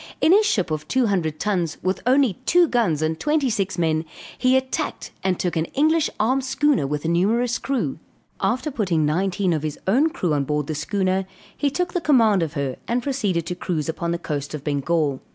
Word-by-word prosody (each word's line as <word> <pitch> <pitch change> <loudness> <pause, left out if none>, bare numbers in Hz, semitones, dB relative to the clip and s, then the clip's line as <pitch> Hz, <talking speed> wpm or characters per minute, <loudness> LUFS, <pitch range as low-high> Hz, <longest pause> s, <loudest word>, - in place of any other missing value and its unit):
In 320 - +4
his 420 +3 +5
ship 190 - 0
of 155 -1 -3
two 260 -1 +2
hundred 170 -7 -1
tons, 180 -6 -1
with 185 +1 -1
only 255 -7 +3
two 350 0 +5
guns 205 - +1
and 160 0 -1
twenty 295 - +1
six 195 -4 -1
men, 160 -2 +1 0.3
he 255 0 +3
attacked 260 0 -3
and 190 -2 0
took 180 - -1
an 160 0 +1
English 310 +2 +3
armed 260 +5 +2
schooner 270 - +1
with 150 +2 -3
a - - +1
numerous 225 +9 +1
crew. 270 -2 -2 0.4
After 255 +5 0
putting 185 - 0
nineteen 185 +4 0
of 155 - -1
his 155 -1 -4
own 260 +12 +3
crew 175 - -1
on 145 -1 +1
board 150 +1 -1
the 155 - -3
schooner, 190 +4 -1 0.3
he 285 - 0
took 350 +5 -2
the 355 - 0
command 225 - +4
of 160 -3 -2
her 140 -4 -3
and 240 +1 0
proceeded 205 - -1
to 180 - -3
cruise 170 -3 -3
upon 170 +1 -3
the 170 - 0
coast 150 -3 -4
of 145 - -8
Bengal. 145 -1 0
190 Hz, 205 wpm, -23 LUFS, 160-255 Hz, 0.4 s, his